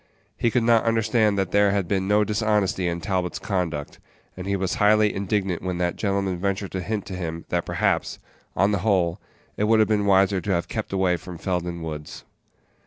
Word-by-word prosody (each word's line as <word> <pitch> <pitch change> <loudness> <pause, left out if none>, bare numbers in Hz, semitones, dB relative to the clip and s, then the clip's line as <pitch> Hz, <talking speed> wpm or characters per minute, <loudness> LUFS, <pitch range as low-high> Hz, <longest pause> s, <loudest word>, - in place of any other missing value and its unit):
He 115 - +1
could 120 +1 +1
not 115 -1 +4
understand 110 -2 +2
that 95 -2 -1
there 100 0 +4
had 100 -3 0
been 95 0 0
no 105 +1 +4
dishonesty 105 -3 0
in 85 0 -2
Talbot's 90 +1 -1
conduct, 85 -8 -3 0.4
and 90 +1 -7
he 100 - +1
was 95 -1 -1
highly 105 0 +4
indignant 95 -2 -1
when 90 -1 -3
that 90 0 -1
gentleman 100 -3 -1
ventured 100 0 -2
to 95 - -3
hint 105 +1 -3
to - - -7
him 85 -2 -5
that 85 -1 -1
perhaps, - - 0 0.4
on 100 +3 +3
the 100 - 0
whole, 95 -3 +1 0.4
it 105 - +1
would 110 +1 +4
have 110 -1 +4
been 105 -2 +1
wiser 95 -1 +4
to 100 - -2
have 85 -1 -1
kept 110 -3 -4
away 95 -2 +1
from 90 0 -9
Felden 85 -1 -3
Woods. 75 -2 -7
95 Hz, 200 wpm, -24 LUFS, 90-105 Hz, 0.4 s, not